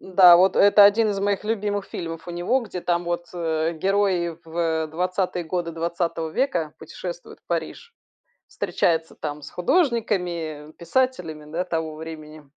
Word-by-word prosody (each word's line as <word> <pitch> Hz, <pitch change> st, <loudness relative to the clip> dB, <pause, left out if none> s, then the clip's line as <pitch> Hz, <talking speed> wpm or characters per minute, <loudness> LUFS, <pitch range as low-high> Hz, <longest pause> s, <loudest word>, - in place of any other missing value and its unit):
Да. 180 Hz, -2 st, +7 dB
Вот 185 Hz, +1 st, +4 dB
это 205 Hz, 0 st, +7 dB
1 215 Hz, +1 st, +5 dB
из 195 Hz, -1 st, -2 dB
моих 200 Hz, 0 st, 0 dB
любимых 205 Hz, -2 st, -1 dB
фильмов 165 Hz, -1 st, -6 dB
у -, -, -3 dB
него. 175 Hz, +10 st, 0 dB
Где, 195 Hz, -6 st, -6 dB
там 175 Hz, 0 st, 0 dB
вот, 175 Hz, 0 st, -3 dB
э, 160 Hz, -1 st, -1 dB
герои 185 Hz, -2 st, +1 dB
в 160 Hz, -1 st, -1 dB
20-е 180 Hz, +2 st, -1 dB
годы 170 Hz, 0 st, -2 dB
20 165 Hz, -1 st, -2 dB
века 170 Hz, -, -1 dB
путешествуют 175 Hz, +2 st, -8 dB
в -, -, -66 dB
Париж. 460 Hz, -, -4 dB, 0.5 s
Встречаются 160 Hz, -1 st, -1 dB
там 150 Hz, -1 st, -5 dB
с -, -, -9 dB
художниками, 180 Hz, -, 0 dB
писателями, 170 Hz, -9 st, -2 dB
да, 175 Hz, +2 st, -1 dB
того 160 Hz, -3 st, -3 dB
времени. 155 Hz, -1 st, -9 dB
175 Hz, 150 wpm, -24 LUFS, 160-195 Hz, 0.5 s, Да